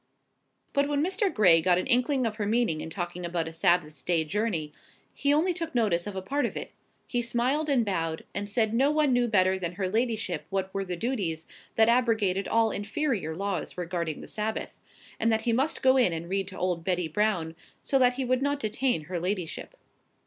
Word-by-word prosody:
But 280 -1 +2
when 290 +1 +1
Mr. 380 +1 0
Gray 175 -6 +5
got 180 +1 +3
an 180 - -1
inkling 255 +1 +3
of 215 -1 -2
her 205 -2 -2
meaning 220 -8 +1
in - - -6
talking 175 +1 -5
about 170 -1 -2
a 165 - -7
Sabbath 165 -3 +1
day's 165 -3 +1
journey, 195 -8 -1 0.4
he 285 - 0
only 325 +5 +3
took 330 -4 -5
notice 205 -6 +1
of 205 - -5
a 190 - -4
part 285 +9 0
of - - -7
it: - - -6 0.3
he 245 - -1
smiled 250 +6 0
and 255 -5 +3
bowed, 165 -5 -2
and 205 0 -3
said 220 +1 +1
no 265 +5 +3
one 300 -3 +2
knew 245 0 +2
better 190 -3 +3
than 175 -1 -3
her 190 +1 -2
ladyship 215 -5 -1
what 190 -1 -2
were 195 - -1
the 180 -2 -4
duties 180 -8 -2 0.3
that 220 0 +5
abrogated 225 -6 +2
all 225 -1 +2
inferior 205 - -2
laws 195 -2 -3
regarding 170 -3 -3
the - - -10
Sabbath; 215 +1 -3 0.5
and 225 +1 +2
that 220 0 +2
he 230 +1 0
must 270 +7 0
go 260 0 +5
in 240 -9 +4
and 165 +1 -5
read 195 0 -1
to 190 - -9
old 180 -2 -1
Betty 180 -1 0
Brown, 170 -2 0 0.3
so 270 - +2
that 250 -1 +4
he 265 0 -2
would 255 +1 +1
not 285 0 0
detain 235 - 0
her 175 +2 -4
ladyship. 180 -1 -4
210 Hz, 210 wpm, -27 LUFS, 180-245 Hz, 0.5 s, Gray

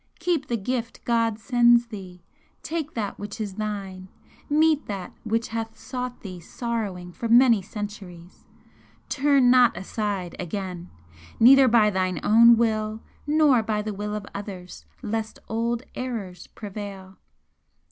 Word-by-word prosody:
Keep 335 -5 -1
the 235 - -1
gift 235 +2 -4
God 230 -2 +1
sends 240 0 +4
thee! 185 -6 -10 0.4
take 320 -2 -4
that 210 -4 -3
which 205 +2 -7
is 205 -3 -4
thine! 195 -3 -5 0.4
meet 305 0 +3
that 195 -3 -5
which 225 +1 -1
hath 225 -1 -4
sought 250 -1 -6
thee 185 -3 -8
sorrowing 195 -2 -4
for 230 +6 -5
many 235 -2 +6
centuries! 195 -4 -9 0.6
Turn 275 -3 +4
not 250 -2 +5
aside 195 -2 -3
again, 180 0 -5 0.5
neither 265 +3 +8
by 220 -3 +4
thine 185 -3 -1
own 235 +2 +7
will 220 -1 0 0.2
nor 295 -5 +4
by 215 -1 -2
the 215 0 -4
will 210 +1 -4
of 210 -2 -5
others, 190 -3 -8 0.2
lest 220 0 -3
old 230 +2 -1
errors 210 -9 -5
prevail. 195 -2 -8
220 Hz, 135 wpm, -25 LUFS, 195-240 Hz, 0.6 s, neither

